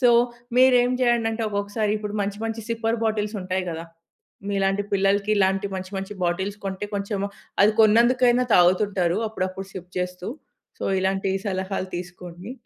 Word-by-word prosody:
So, 250 - +5 0.5
మీరేం 250 -1 +6
జేయండంటే, 230 -2 +1
ఒక్కొక్కసారి 205 +1 -1 0.3
మంచి 200 +1 -3
మంచి 225 0 -3
సిప్పర్ 230 0 -1
బాటిల్స్ 215 0 -1
ఉంటాయి 185 0 -2
గదా! 165 +1 -5 0.6
మీలాంటి 195 0 +1
పిల్లలకి 200 +1 +2
ఇలాంటి 195 0 +2
మంచి 185 0 -5
మంచి 195 +1 -4
బాటిల్స్ 190 +4 -1
కొంటే 195 +1 -3
కొంచెం, 200 0 -2 0.4
అది 210 +1 +5
కొన్నందుకైనా 240 +3 +5
తాగుతుంటారు, 180 0 +3
అప్పుడప్పుడు 190 -2 -4
సిప్ 180 0 -9
జేస్తూ. 180 0 -4 0.5
సో, - - -4 0.2
ఇలాంటి 190 0 0 0.2
సలహాలు 190 -1 -2
తీసుకోండి. 180 +3 -8
200 Hz, 135 wpm, -24 LUFS, 185-220 Hz, 0.6 s, మీరేం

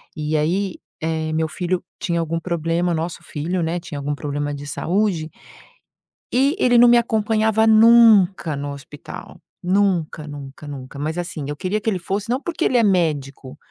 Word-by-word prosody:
E 155 -1 -2
aí, 180 +5 -1 0.2
eh, 160 0 -2
meu 160 0 0
filho 180 +2 -2 0.2
tinha 170 -1 -1
algum 165 0 -2
problema 170 0 -1
nosso 165 +2 -4
filho, 170 +4 -3
né, 165 +2 -1
tinha 165 -5 -7
algum 145 +1 -2
problema 145 0 -3
de 145 - -8
saúde 170 +2 -1 1.0
e 275 +6 +3
ele 245 -7 +4
não 240 +1 +8
me 240 - +6
acompanhava 220 -1 +2
nunca 220 -7 +5
no 145 0 -4
hospital. 140 +1 -11 0.2
Nunca 180 -5 0
nunca 145 0 -9
nunca. 140 -1 -8
Mas 155 +3 -3
assim, 170 -4 -4
eu 145 - -4
queria 200 +5 -2
que 225 - 0
ele 200 - 0
fosse, 200 +5 -3
não 250 - +1
porque 330 +1 -4
ele 250 - +3
é 235 - +4
médico 150 -8 -1
170 Hz, 170 wpm, -21 LUFS, 150-205 Hz, 1.0 s, não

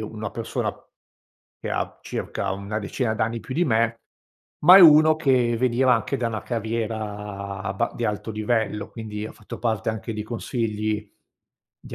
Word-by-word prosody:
una 110 -1 -5
persona - - -3 0.9
che - - -5
ha - - -3
circa 95 -1 -3
una 100 +2 -4
decina 110 +2 -2
d'anni 115 +1 -1
più 130 - -7
di 175 +4 +2
me, 115 -2 +1 0.6
ma 180 +5 +9
è - - +10
uno 155 -1 +8
che 125 -6 +2
veniva 125 +1 +3
anche 125 +4 -1
da 120 -2 -1
una 110 -2 -4
carriera 105 -4 -4
abba 95 0 -1
di 120 - -2
alto 105 +1 -2
livello, 110 -1 -1
quindi 110 -2 -6
ha - - -9
fatto 105 -2 -10
parte 110 -2 -1
anche 110 +1 -5
di 105 - -4
consigli 110 -2 -3 0.7
di - - -10
110 Hz, 160 wpm, -24 LUFS, 105-120 Hz, 0.9 s, è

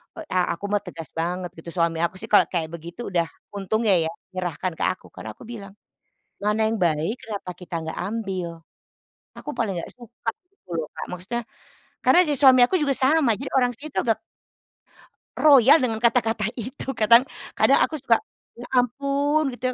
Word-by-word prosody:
Oh, 325 - -7
a 180 -2 +1
aku 200 - -8
mah 205 - +3
tegas 170 -4 -9
banget 175 +2 -3
gitu, 165 +1 -10
suami 170 -1 +1
aku 170 +2 0
sih 210 - -3
kalau 210 - +6
kayak 165 -3 -3
begitu 170 +6 -7
udah 170 -2 +1 0.2
untungnya 205 +1 +1
ya, - - -3 0.2
menyerahkan 180 -1 -3
ke - - -1
aku. 185 - -5
Karena - - -9
aku - - -14
bilang 205 -4 -9 0.7
"mana 215 +1 +2
yang 225 - 0
baik, 170 +2 0
kenapa 205 -4 -6
kita 175 -1 -8
nggak 160 - -5
ambil?" 190 -3 -3 0.9
Aku - - -8
paling 215 -5 0
gak - - -8
suka 240 -1 -6 0.2
gitu 365 - -36
loh 160 - -2
Kak, - - -6
maksudnya 185 +7 -4 0.6
karena 360 - +6
si 295 -5 +1
suami 260 -3 +7
aku 355 +9 +4
juga 280 -3 +1
sama, 265 -3 +3
jadi 270 +5 -6
orang 245 -1 +2
situ 295 +5 -7
agak 225 -3 +1 1.2
royal 285 0 +7
dengan 225 -3 0
kata-kata 230 -3 +2
itu. 260 +3 -5
Kadang 235 +4 +6 0.3
kadang - - +5
aku 315 - -1
suka 230 -2 +3 0.4
"ya 240 - -10 0.2
ampun" 280 +4 0
gitu 255 0 -2
220 Hz, 175 wpm, -24 LUFS, 180-255 Hz, 1.2 s, suami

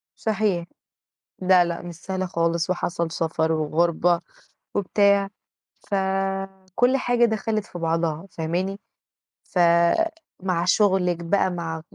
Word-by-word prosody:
صحيح. 205 -5 0 0.8
لأ، 185 -1 +5
لأ، 170 0 -4
مش 175 -1 -8
سهلة 185 +2 -4
خالص، 170 -1 0
وحصل 170 -2 -1
سفَر 160 -1 0
وغربة 170 +2 +1 0.5
وبتاع، 200 0 +3 0.5
فكل 195 +4 -1
حاجة 245 -2 +3
دخلِت 220 -1 -1
في 175 - -9
بعضها، 165 0 -1
فاهماني؟ 180 +5 -2 0.6
ف 180 - -4 0.8
مع 175 -3 0
شغلِك 185 -2 +3
بقى، 190 +2 +1
مع 165 -2 -4
180 Hz, 105 wpm, -24 LUFS, 170-195 Hz, 0.8 s, لأ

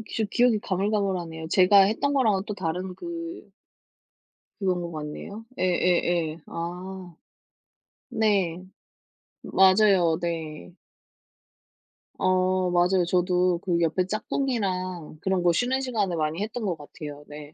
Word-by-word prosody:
저 220 - +1
기억이 240 -3 +3
가물가물하네요. 185 -5 -2
제가 195 +2 +6
했던 220 +8 +1
거랑은 215 -8 +2
또 210 - -3
다른 180 0 -3
그 335 - -7 1.1
그런 185 -3 0
것 170 0 -5
같네요. 160 +8 -7
예예예. 175 -3 +1
아. 180 +1 -6 0.9
네. 200 -7 0 0.8
맞아요 190 -4 +4
네. 165 -1 -5 1.4
어 185 0 +2
맞아요. 180 +1 +3
저도 180 -1 +2
그 175 -2 0
옆에 170 +3 +1
짝꿍이랑 185 - -2
그런 190 -2 0
거 175 - +5
쉬는 250 +9 0
시간에 210 -9 -1
많이 155 +3 -1
했던 220 +2 -4
것 175 -4 -1
같아요. 145 0 -9
네. 150 0 -10
185 Hz, 230 characters per minute, -26 LUFS, 170-205 Hz, 1.4 s, 제가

